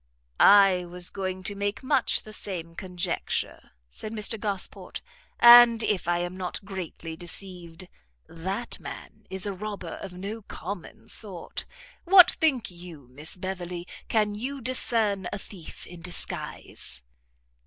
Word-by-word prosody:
"I 195 -3 +7
was 175 0 -2
going 185 -1 -4
to 205 - +1
make 200 +3 -3
much 260 -1 +2
the 215 - -10
same 170 -6 -2
conjecture," 180 0 -3 0.2
said 215 - -6
Mr 215 0 0
Gosport, 200 -3 -3 0.4
"and, 235 -1 +9
if 200 -6 0
I 175 0 +2
am 175 +1 -3
not 185 +2 -4
greatly 175 -4 -6
deceived, 175 0 -6 0.4
that 190 +8 -4
man - - -10
is 190 0 -1
a 200 - -2
robber 195 -3 -6
of 195 - -7
no 200 +5 -6
common 200 +3 -8
sort. 195 -7 -3 0.4
What 365 0 +8
think 265 -11 +1
you, 170 -7 -12
Miss 150 +7 -3
Beverley, 180 -1 -5 0.2
can 210 -2 +1
you 260 +7 -4
discern 225 -6 +1
a - - -3
thief 190 -4 -10
in 175 -1 -11
disguise?" 170 - -3
190 Hz, 135 wpm, -27 LUFS, 175-215 Hz, 0.4 s, and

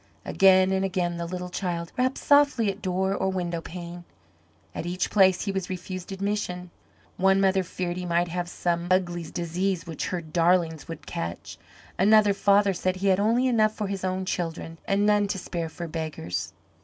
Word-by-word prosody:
Again 190 -1 +5
and 190 0 +1
again 175 -2 -1
the 170 0 -4
little 180 0 -5
child 170 -3 -3
rapped 255 +1 0
softly 285 -7 +4
at 195 +2 -12
door 190 0 0
or 190 -1 0
window 175 -3 -2
pane. 175 0 -8 0.7
At 170 - -5
each 180 +1 -2
place 190 -3 +4
he 200 - -1
was 190 -2 -3
refused 185 0 -6
admission. 190 -3 -3 0.5
One 195 +1 +4
mother 195 0 +3
feared 180 -1 -4
he 180 - -4
might 170 +1 +1
have 175 +1 -3
some 175 -1 -1
ugly 175 -2 +1
disease 175 +1 -2
which 165 -3 -4
her 180 - -2
darlings 165 0 +1
would 165 -2 -8
catch; 85 +1 -6 0.4
another 210 +1 +5
father 200 0 +3
said 185 +1 -1
he 195 +1 0
had 190 0 +3
only 230 +5 +2
enough 215 -3 +2
for 210 - -3
his 195 -1 -4
own 185 0 -1
children 165 -2 -4
and 200 +1 +2
none 210 -1 +3
to 195 - -2
spare 170 -2 -4
for 170 +1 -7
beggars. 150 - -4
185 Hz, 180 wpm, -26 LUFS, 175-195 Hz, 0.7 s, Again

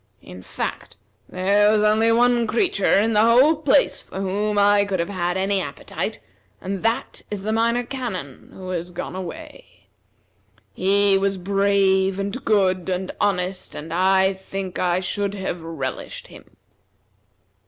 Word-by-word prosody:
In 90 +1 -11
fact, - - -6 0.3
there 200 +3 +3
was 210 0 +3
only 220 +2 +3
one 240 0 +3
creature 215 - +2
in 225 +2 +1
the 210 - +4
whole 250 +8 +5
place 315 +10 +2
for - - -9
whom 205 +2 -1
I 205 0 +4
could 195 -2 -2
have 170 - -1
had 180 -2 -2
any 195 0 0
appetite, 140 -5 -5 0.4
and 190 0 -5
that 225 +1 -2
is 205 -2 -5
the 215 +1 -1
Minor 235 +2 +1
Canon, 230 - -6
who 185 -1 -9
has 175 -1 -3
gone 180 +1 -6
away. 190 - -9 0.9
He 195 +1 +3
was 195 0 0
brave, 195 0 +2
and 200 +6 -4
good, 190 -4 +1
and 185 0 -2
honest, 185 -1 -1
and 160 +2 -7
I 190 +2 +3
think 190 -1 -6
I 180 0 +1
should 200 +2 -2
have 190 -3 -4
relished 160 -5 -6
him." - - -16
195 Hz, 150 wpm, -22 LUFS, 185-210 Hz, 0.9 s, whole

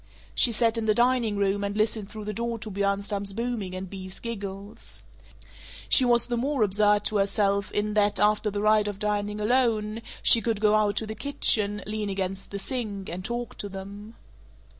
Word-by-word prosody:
She 240 - +4
sat 230 0 +1
in 220 - -3
the 215 - +3
dining 240 -3 +2
room 200 0 0
and 200 +1 -3
listened 215 -1 0
through 215 -1 -8
the 210 - -4
door 235 +2 -3
to 215 -1 -8
Bjornstam's 200 0 -1
booming 225 -4 -4
and 185 +1 -5
Bea's 185 0 -8
giggles. 200 -3 -8 0.9
She 265 - +8
was 240 -1 +4
the 240 -1 -2
more 270 0 0
absurd 210 +1 +3
to 215 - 0
herself 200 0 +1
in 210 0 -1
that, 205 -2 +2
after 210 +1 +2
the 205 0 -3
rite 215 0 +3
of 205 -2 -4
dining 210 0 -2
alone, 220 -1 +1 0.2
she 230 - +8
could 225 -3 -1
go 210 0 +3
out 210 -1 +2
to 220 - -1
the 215 - -5
kitchen, 210 -5 +1
lean 210 0 -3
against 195 0 -4
the 200 - -5
sink, 205 -3 -4
and 180 +2 -6
talk 240 +2 -5
to 205 - -4
them. 200 +3 -9
210 Hz, 190 wpm, -26 LUFS, 200-225 Hz, 0.9 s, She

